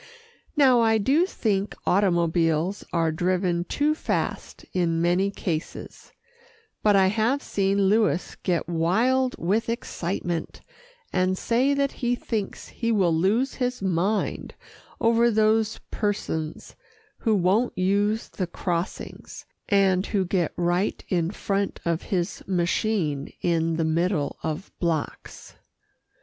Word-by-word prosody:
Now 260 -4 +6
I 225 -1 +4
do 280 - +2
think 205 - -1
automobiles 170 -1 +1
are 165 -2 +1
driven 175 +1 0
too 295 +8 +1
fast 310 - -3
in 170 -3 +1
many 175 +3 +2
cases, 170 -4 -5 0.7
but 210 -1 +4
I 190 -1 +5
have 230 +7 +1
seen 195 0 +1
Louis 200 -2 +2
get 175 -4 0
wild 225 +11 +1
with 210 +7 0
excitement, 175 -6 -3 0.5
and 185 0 +1
say 255 +7 +2
that 280 0 +1
he 245 0 -1
thinks 220 -4 -4
he 230 -1 -2
will 190 -6 +3
lose 205 +11 +1
his 250 -4 -2
mind 190 +3 -1 0.4
over 235 +1 +4
those 220 0 +2
persons 160 -7 -3 0.4
who 220 -3 +2
won't 200 +6 +1
use 205 +4 +1
the 185 - -4
crossings, 175 0 -5 0.2
and 195 -2 +3
who 195 -3 0
get 175 -2 0
right 175 +3 0
in 170 -3 +1
front 200 0 -2
of 170 -1 0
his 175 -3 -1
machine 175 -5 0
in 165 -1 +1
the 165 0 0
middle 165 -1 0
of 160 +4 -4
blocks. 165 -4 -4
190 Hz, 120 wpm, -25 LUFS, 170-220 Hz, 0.7 s, Now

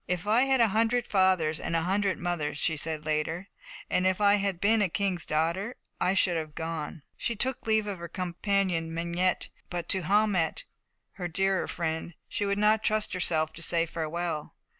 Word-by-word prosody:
"If 180 +1 -2
I 225 +5 +4
had 270 - +2
had - - +5
a 230 - +6
hundred 230 +3 +2
fathers 185 -6 +2
and 165 - -2
a 165 - +1
hundred 195 +1 +1
mothers," 155 -4 -2
she 160 +1 +1
said 155 0 -4
later, 160 +4 -2 0.4
"and 185 - +2
if 185 0 +1
I 205 0 +5
had 195 -3 -1
been 220 +3 +3
a 195 - +2
king's 185 -1 -1
daughter, 170 +9 0 0.2
I 185 - +2
should 180 -2 +3
have 155 -2 -5
gone." 160 -2 -5
She 235 - -2
took 260 +2 0
leave 220 -1 +3
of 200 -3 -4
her 170 - -6
companion 180 -2 -1
Mengette, 170 +2 0 0.2
but 175 -1 -4
to 190 - +3
Haumette, 195 -3 +1 0.5
her 180 -2 -5
dearer 190 +2 0
friend, 160 0 -3
she 205 - -2
would 200 0 0
not 215 +1 +3
trust 215 0 +1
herself 160 -4 +2
to 165 - -8
say 170 0 +2
farewell. 165 -1 -4
180 Hz, 190 wpm, -28 LUFS, 165-200 Hz, 0.5 s, a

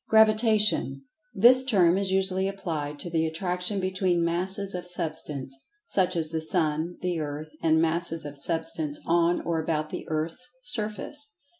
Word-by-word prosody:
Gravitation: 215 - +3 0.3
This 245 +6 +6
term 185 -9 +3
is 195 0 0
usually 190 0 +1
applied 160 -7 -4
to 175 - -5
the 160 -1 +1
attraction 180 +4 0
between 185 -2 0
Masses 190 +4 -2
of 180 0 -5
Substance, 155 -6 -2 0.3
such 185 - +2
as 160 -2 -1
the 160 -1 -2
Sun, 160 0 0
the 180 -2 -1
Earth, 150 +1 -5
and 160 -1 +3
Masses 165 -1 +1
of 145 -1 -7
Substance 160 0 -1
on 170 +1 +2
or 165 -1 -1
about 155 -1 -2
the - - -6
Earth's 160 +11 -3
surface. 245 +5 -2
170 Hz, 150 wpm, -26 LUFS, 160-195 Hz, 0.3 s, This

